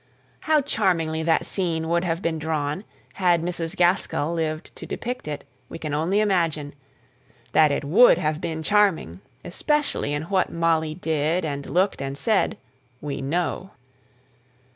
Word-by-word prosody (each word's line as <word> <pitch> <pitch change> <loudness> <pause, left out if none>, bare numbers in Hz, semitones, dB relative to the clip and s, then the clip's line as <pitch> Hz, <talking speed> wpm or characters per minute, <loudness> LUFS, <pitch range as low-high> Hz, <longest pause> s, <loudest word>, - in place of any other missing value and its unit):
How 310 -1 +2
charmingly 175 - 0
that 160 0 +2
scene 165 -4 -1
would 170 +1 +1
have 170 0 -2
been 160 -1 -1
drawn, 155 +3 -2 0.3
had 175 -3 +2
Mrs. 170 -2 -2
Gaskell 175 -3 +1
lived 160 -1 -3
to - - -8
depict 245 -7 -5
it, 150 -1 -4 0.3
we - - -7
can 155 -3 -5
only 170 +8 +1
imagine: 165 -8 0 0.8
that 155 -2 +5
it 140 - -1
would 200 +13 +6
have 155 +1 -1
been 160 -1 -3
charming 190 - +2 0.2
especially 295 - -1
in 145 +1 -2
what 185 +2 0
Molly 160 -2 +1
did, 160 +1 0
and 140 -2 -4
looked, 185 -3 +1
and 135 0 -4
said 215 +3 +1 0.4
we 145 -2 -4
know. 175 +6 -2
165 Hz, 145 wpm, -24 LUFS, 155-185 Hz, 0.8 s, would